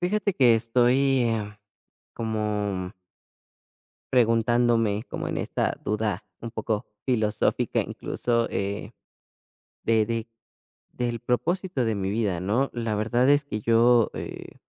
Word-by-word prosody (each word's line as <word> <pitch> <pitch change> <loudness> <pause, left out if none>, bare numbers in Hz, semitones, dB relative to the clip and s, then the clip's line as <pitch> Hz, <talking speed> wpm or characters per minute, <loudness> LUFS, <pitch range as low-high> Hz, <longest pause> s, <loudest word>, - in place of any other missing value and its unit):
Fíjate 200 +3 0
que 125 -6 +5
estoy 125 +4 +3
em, 110 -3 -1 0.6
como 105 -4 -2 1.2
preguntándome, 115 -2 +3
como - - -4
en - - -3
esta - - -1
duda 105 -2 -1 0.2
un 115 - -6
poco 110 -1 -2 0.2
filosófica, 110 -4 +1
incluso, 115 -1 -1
eh, 100 +1 -3 0.9
de 110 -1 +3
de 115 0 -3 0.7
del 120 -1 -2
propósito 165 - -1
de 110 -1 0
mi 95 -1 -2
vida, 100 -4 0
¿no? 115 +9 +1
La 115 -3 -2
verdad 120 +5 +2
es 145 0 +4
que 105 -6 -4
yo, 115 +1 +4
eh, - - -7
115 Hz, 120 wpm, -26 LUFS, 105-125 Hz, 1.2 s, que